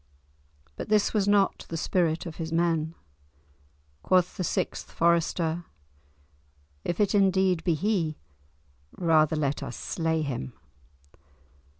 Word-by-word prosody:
But - - -6
this 210 -1 +3
was 205 -3 +1
not 205 -1 +2
the 165 - -3
spirit 165 -1 0
of 165 -2 -7
his 160 -1 -4
men. 165 -1 0 1.1
Quoth 180 - +2
the 185 - -3
sixth - - -2
Forester, 170 0 +1 1.2
"If 175 - -3
it 205 0 +2
indeed 190 -3 +3
be 170 -3 +2
he, 170 -3 0 0.8
rather 160 -2 +3
let 145 -2 -1
us 135 -3 -6
slay 160 -2 -1
him." 120 - -4
170 Hz, 115 wpm, -27 LUFS, 160-185 Hz, 1.2 s, this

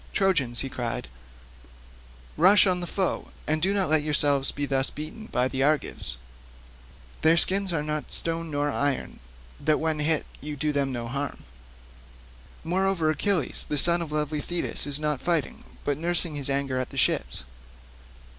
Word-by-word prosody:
"Trojans," 150 - +1
he 135 - -3
cried, 120 - -4 1.3
"rush 190 +6 +6
on 185 -2 +2
the 175 - -3
foe, 190 +1 -1 0.2
and 155 +1 0
do 190 +4 +2
not 200 -2 +1
let 155 0 +4
yourselves 145 -2 +2
be 145 - -3
thus 135 -1 +1
beaten 215 +9 -8
by 125 +1 0
the 130 0 -3
Argives. 145 - 0 1.0
Their 160 +1 +5
skins 195 +2 +3
are 155 -3 -1
not 150 0 -4
stone 165 0 0
nor 145 0 -1
iron 140 0 -1 0.4
that 155 - +1
when 160 -1 -1
you 150 - 0
hit 160 0 +3
them - - -19
you 150 +1 -5
do 150 +2 -1
them 140 -2 0
no 120 -2 -4
harm. 140 +3 -4 1.2
Moreover, 180 -1 +1
Achilles, 160 -1 -1
the 150 - -1
son 170 +4 +5
of 160 -3 -5
lovely 150 0 -2
Thetis, 175 -3 -2
is 145 0 +3
not 150 -3 -1
fighting, 170 -4 -1 0.2
but 145 -1 0
is - - -11
nursing 170 -1 +2
his 140 -2 -1
anger 135 -2 -1
at 130 - -3
the - - -10
ships." - - 0
150 Hz, 175 wpm, -26 LUFS, 140-170 Hz, 1.3 s, rush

